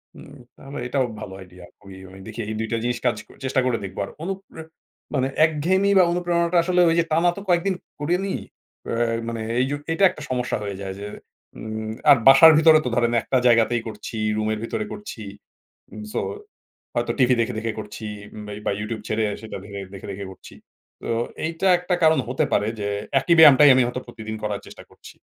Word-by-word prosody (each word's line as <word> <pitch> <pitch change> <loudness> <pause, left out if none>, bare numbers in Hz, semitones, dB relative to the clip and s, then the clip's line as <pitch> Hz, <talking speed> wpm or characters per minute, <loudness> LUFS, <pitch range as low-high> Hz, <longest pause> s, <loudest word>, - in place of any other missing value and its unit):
হুম, 145 -1 -13 0.2
তাহলে 140 +1 -8
এটাও 130 0 0 0.2
ভালো 95 - -7
আইডিয়া। 90 -1 -13 0.2
ওই 95 - -11 0.2
ওই 95 - -13
দেখি 110 +1 -9
এই - - -3
২ 110 - -2
টা 115 - +1
জিনিস 120 -1 -1
কাজ 120 - +2 0.3
চেষ্টা 130 0 +1
করে 125 -2 +1
দেখব 95 -1 -8
আর - - -11
অণুপ্রে 195 -3 -6 0.5
মানে 130 -1 +1 0.2
একঘেয়েমি 180 +6 +1
বা - - +7
অনুপ্রেরণাটা 175 0 +1
আসলে 180 +1 +2
ওই 165 - +2
যে - - +4
টানা 165 +3 +3
তো - - -6
কয়েকদিন 180 +2 +2 0.2
করি 155 +4 0
নি, 195 - -2 0.5
অ্যা - - -2 0.3
মানে 115 -1 -4 0.2
এই 130 - +3
জু - - 0 0.2
এইটা 165 +5 0
একটা 155 - -10
সমস্যা 125 -2 -1
হয়ে 100 -1 -4
যায় 95 -1 -5
যে - - -5 0.5
উম 110 0 -5 0.2
আর - - +8
বাসার 135 +4 +9
ভিতরে 160 -1 +7
তো - - 0
ধরেন 120 0 +2
একটা 130 - 0
জায়গাতেই 115 0 +3
করছি, 110 +1 -7 0.2
রুমের 110 0 -1
ভিতরে 110 -2 -3
করছি, 205 - -9 0.7
উম 105 - -8
সো - - 0 0.7
হয়তো - - 0
টিভি 130 -1 +5
দেখে, 115 +2 -2
দেখে 115 0 -2
করছি 105 +1 -8 0.4
বা 105 - -8
বা - - +1
ইউটিউব 105 +1 -4
ছেড়ে 110 0 0 0.2
সেটা 110 - -7
দেখে, 100 -1 -7 0.3
দেখে 100 +1 -6
করছি, 95 - -14 0.5
তো - - -7 0.4
এইটা 165 +4 -1
একটা 180 0 -1
কারণ 160 -2 +5
হতে 135 +4 0
পারে 105 - +2
যে 100 - -2 0.3
একি 170 +6 +2
ব্যায়ামটাই 145 -2 +9
আমি 130 - +4
হয়তো 125 +1 -4
প্রতিদিন 110 -2 -7
করার 105 -1 -3
চেষ্টা - - -12
করছি, - - -15
125 Hz, 195 wpm, -23 LUFS, 110-160 Hz, 0.7 s, বাসার